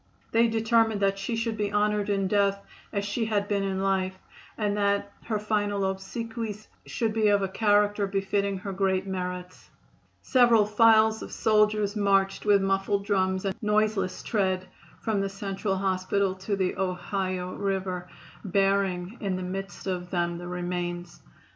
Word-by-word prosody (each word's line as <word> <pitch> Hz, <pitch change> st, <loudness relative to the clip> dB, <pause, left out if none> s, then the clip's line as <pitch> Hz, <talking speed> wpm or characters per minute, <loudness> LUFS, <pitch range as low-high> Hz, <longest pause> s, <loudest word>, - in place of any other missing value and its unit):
They 230 Hz, +1 st, +4 dB
determined 225 Hz, -1 st, +2 dB
that 195 Hz, 0 st, +1 dB
she 195 Hz, +4 st, -2 dB
should 225 Hz, 0 st, -1 dB
be 205 Hz, -1 st, -1 dB
honored 210 Hz, 0 st, +1 dB
in 195 Hz, -1 st, +1 dB
death 200 Hz, 0 st, +2 dB, 0.3 s
as 200 Hz, -2 st, -2 dB
she 220 Hz, +3 st, -1 dB
had 205 Hz, -2 st, 0 dB
been 205 Hz, -1 st, 0 dB
in 195 Hz, -1 st, -1 dB
life, 190 Hz, -1 st, 0 dB, 0.4 s
and 205 Hz, -2 st, 0 dB
that 200 Hz, 0 st, +1 dB
her 220 Hz, -2 st, -1 dB
final 205 Hz, -1 st, 0 dB
obsequies 215 Hz, +3 st, -4 dB, 0.2 s
should 225 Hz, -2 st, -1 dB
be 220 Hz, -1 st, +2 dB
of 205 Hz, -1 st, +3 dB
a -, -, +1 dB
character 205 Hz, 0 st, +2 dB
befitting 195 Hz, 0 st, -1 dB
her 195 Hz, +1 st, -5 dB
great 190 Hz, 0 st, +1 dB
merits. 180 Hz, -1 st, -5 dB, 0.5 s
Several 240 Hz, -5 st, +5 dB
files 220 Hz, +1 st, +4 dB
of -, -, -7 dB
soldiers 215 Hz, -1 st, +2 dB
marched 195 Hz, -1 st, +2 dB
with 200 Hz, -2 st, +4 dB
muffled 195 Hz, +1 st, 0 dB
drums 190 Hz, -2 st, +1 dB
and 190 Hz, -1 st, -1 dB
noiseless 210 Hz, -3 st, 0 dB
tread 190 Hz, -4 st, 0 dB, 0.4 s
from 215 Hz, -3 st, 0 dB
the 195 Hz, -, -1 dB
Central 195 Hz, 0 st, -3 dB
Hospital 190 Hz, 0 st, 0 dB
to 190 Hz, +2 st, -3 dB
the 190 Hz, -2 st, -1 dB
Ohio 185 Hz, 0 st, -2 dB
River, 190 Hz, -2 st, -3 dB, 0.3 s
bearing 195 Hz, 0 st, 0 dB
in 195 Hz, -3 st, -1 dB
the 185 Hz, -, -4 dB
midst 195 Hz, +2 st, -6 dB
of 180 Hz, -2 st, -3 dB
them 175 Hz, -1 st, -1 dB
the 175 Hz, -, -7 dB
remains. 175 Hz, 0 st, -4 dB
200 Hz, 155 wpm, -27 LUFS, 190-210 Hz, 0.5 s, Several